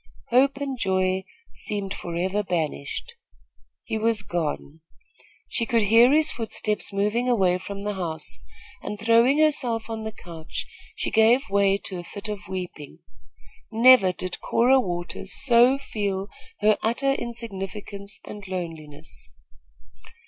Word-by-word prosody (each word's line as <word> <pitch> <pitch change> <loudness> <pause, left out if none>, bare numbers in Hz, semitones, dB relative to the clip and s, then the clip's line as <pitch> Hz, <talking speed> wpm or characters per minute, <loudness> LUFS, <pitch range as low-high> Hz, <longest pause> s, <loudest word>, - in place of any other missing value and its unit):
Hope 270 +3 +4
and 275 -3 -4
joy 190 -1 0 0.3
seemed 200 -2 -2
forever 180 +4 -2
banished. 170 - -3 0.7
He 220 - -3
was 220 -1 +1
gone. 160 -3 -4 0.7
She 230 - -1
could 230 -4 +2
hear 230 +5 +6
his 310 +1 +3
footsteps 215 -2 -1
moving 210 +5 0
away 185 -6 +3
from 200 +1 -7
the 210 0 -2
house, 165 -5 -3 0.4
and, 210 - -6
throwing 230 +5 +4
herself 245 -8 +1
on 220 -1 -4
the 220 - -4
couch, 170 -6 -7 0.3
she - - -2
gave 225 +2 +4
way 200 -1 +3
to 190 -2 -5
a - - -7
fit 200 +4 -7
of 200 -4 -6
weeping. 180 -6 -6 0.7
Never 230 -4 +7
did 180 0 -5
Cora 255 +3 +4
Waters 175 -2 -4
so 245 +1 +5
feel 200 -7 -3 0.3
her 215 0 +4
utter 240 +5 +1
insignificance 200 -4 -6
and 205 -1 -9
loneliness. 155 - -7
205 Hz, 130 wpm, -25 LUFS, 185-235 Hz, 0.7 s, Never